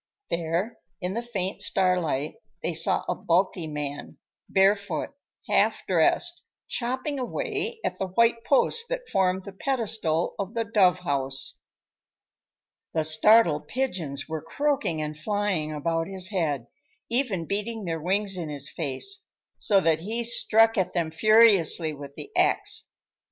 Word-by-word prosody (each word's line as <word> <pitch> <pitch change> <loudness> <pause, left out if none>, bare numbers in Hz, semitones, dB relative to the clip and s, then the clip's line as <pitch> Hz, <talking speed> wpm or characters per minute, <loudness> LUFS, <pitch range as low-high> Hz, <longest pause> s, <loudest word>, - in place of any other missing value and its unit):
There, 170 +7 -1 0.2
in 180 -1 -3
the 230 - -2
faint 200 -6 -2
starlight, 170 -6 0 0.3
they - - -1
saw - - 0
a - - +1
bulky 175 -1 0
man, 145 -1 -5 0.3
barefoot, 195 -3 +2 0.4
half - - +2
dressed, 350 0 +1 0.3
chopping 260 +4 -2
away 435 - -3
at 185 - -2
the 190 - -1
white 230 +4 +2
post 460 - +2
that - - -4
formed 190 - +1
the 200 - -8
pedestal 210 - -1
of 200 +3 -4
the 230 - +1
dove 185 -4 +3
house. 135 -4 -2 1.4
The 160 - +2
startled 160 0 +4
pigeons 175 - -2
were 160 -1 -4
croaking 275 - -1
and 150 0 -4
flying 185 -2 -1
about 165 +2 -1
his 190 -1 -1
head, 155 - -1 0.4
even 230 -9 0
beating 210 +3 -3
their 165 -2 -3
wings 195 +3 0
in 165 -3 -4
his 140 -1 -6
face, 170 - -3 0.3
so 200 -2 +4
that 160 -2 +2
he 220 +7 -3
struck 225 -1 +4
at 185 - -1
them 170 -3 -1
furiously 195 -5 +5
with 140 -1 -10
the 415 - -9
axe. - - +1
190 Hz, 140 wpm, -26 LUFS, 160-230 Hz, 1.4 s, furiously